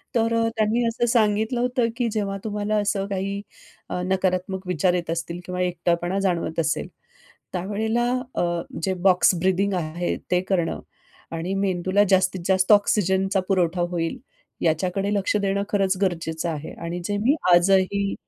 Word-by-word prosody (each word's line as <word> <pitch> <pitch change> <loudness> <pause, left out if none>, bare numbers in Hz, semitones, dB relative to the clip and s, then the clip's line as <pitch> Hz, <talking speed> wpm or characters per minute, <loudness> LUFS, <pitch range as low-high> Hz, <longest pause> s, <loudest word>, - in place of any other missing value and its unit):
तर 230 0 +2 0.2
त्यांनी 220 +2 +2
असं 230 +1 0
सांगितलं 220 +1 +2
होतं, 250 -1 +1
की 245 - +1
जेव्हा 200 -2 -2
तुम्हाला 210 0 -2
असं 200 -1 0
काही, 195 0 -3 0.6
नकारात्मक 185 0 -1
विचार 180 0 +2
येत 175 -2 -2
असतील 170 +1 -4
किंवा 180 0 -3
एकटपणा 175 +1 0
जाणवत 175 -4 -1
असेल, 155 -1 0 0.7
त्यावेळेला 210 +6 -1 0.3
अ, - - 0 0.4
जे 190 +3 0
बॉक्स 180 0 +5
ब्रीथिंग 190 +2 +1
आहे, 175 0 -2
ते 180 - +3
करणं 175 -4 0 0.5
आणि 165 +3 -3
मेंदूला 190 0 +1
जास्तीत 185 -1 +3
जास्त 190 +1 +3
ऑक्सिजनचा 195 -1 +3
पुरवठा 180 -2 +1
होईल, 165 -2 -2 0.4
याच्याकडे 180 +5 0
लक्ष 200 +1 +1
देणं 200 0 0
खरंच 195 -2 +1
गरजेचं 165 -2 -1
आहे. 155 -2 -5
आणि 170 +1 -4
जे 205 +2 -1
मी 245 +8 +3 0.2
आजही 195 +2 +3
190 Hz, 140 wpm, -24 LUFS, 175-205 Hz, 0.7 s, बॉक्स